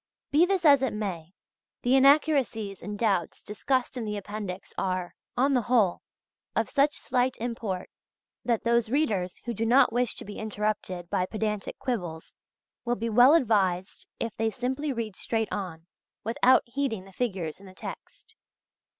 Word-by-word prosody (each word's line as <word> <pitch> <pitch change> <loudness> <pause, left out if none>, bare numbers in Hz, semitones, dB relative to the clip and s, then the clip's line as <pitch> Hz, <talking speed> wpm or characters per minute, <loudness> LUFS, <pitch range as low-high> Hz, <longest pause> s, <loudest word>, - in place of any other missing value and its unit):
Be 320 +5 +5
this 380 -3 0
as 280 -3 +7
it 265 - 0
may, 185 -4 -5 0.5
the 245 +2 +4
inaccuracies 270 - +3
and 205 +3 -5
doubts 200 -7 0
discussed 255 +5 -1
in 245 - -3
the 210 -1 -3
appendix 205 -2 -6
are, 185 -2 -2 0.2
on 275 +3 +3
the 250 - +3
whole, 225 -6 +2 0.5
of - - +1
such 285 +1 +2
slight 255 0 0
import, 225 -6 -3 0.6
that 235 -3 0
those 235 -1 +2
readers 210 -10 0
who 240 - -2
do 220 +1 -2
not 250 +3 +5
wish 245 0 +1
to - - -6
be 205 - -8
interrupted 210 -4 -3
by 185 - +1
pedantic 210 -1 -3
quibbles 175 -10 -4 0.5
will 240 0 0
be 230 +1 -3
well 245 +7 +7
advised 195 - +1
if 230 - -3
they 225 0 +1
simply 260 +5 -2
read 230 -5 -4
straight 225 +1 -1
on, 175 -5 -5 0.4
without 235 +3 +4
heeding 235 -5 -2
the 195 - -15
figures 185 -9 -3
in 195 - -14
the 185 - -14
text. - - -10
225 Hz, 160 wpm, -27 LUFS, 195-255 Hz, 0.6 s, as